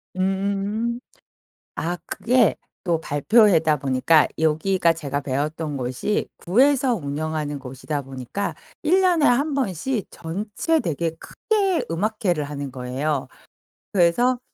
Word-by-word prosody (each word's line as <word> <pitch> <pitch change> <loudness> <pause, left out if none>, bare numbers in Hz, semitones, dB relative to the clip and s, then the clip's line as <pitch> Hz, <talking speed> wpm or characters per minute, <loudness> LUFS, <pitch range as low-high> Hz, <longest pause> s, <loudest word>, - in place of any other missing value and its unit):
음음음. 200 +5 -1 0.8
아 175 +2 -2
그게 250 +3 +2 0.3
또 170 -3 +1
발표회다 160 - +4
보니까 135 +4 +3
여기가 165 +3 +2
제가 145 -3 -3
배웠던 145 +2 -2
곳이 130 +11 -1
구에서 260 +6 +3
운영하는 150 -2 -3
곳이다 135 +3 -4
보니까 135 +8 -5 0.3
1 360 +5 +3
년에 350 -5 +3
1 280 +5 +3
번씩 230 - -1
전체 210 - -2
되게 165 - -1
크게 390 - -1
음악회를 190 -2 0
하는 140 -1 -5
거예요. 130 +3 -2 0.7
그래서 205 +8 +3
170 Hz, 245 characters per minute, -23 LUFS, 145-225 Hz, 0.8 s, 발표회다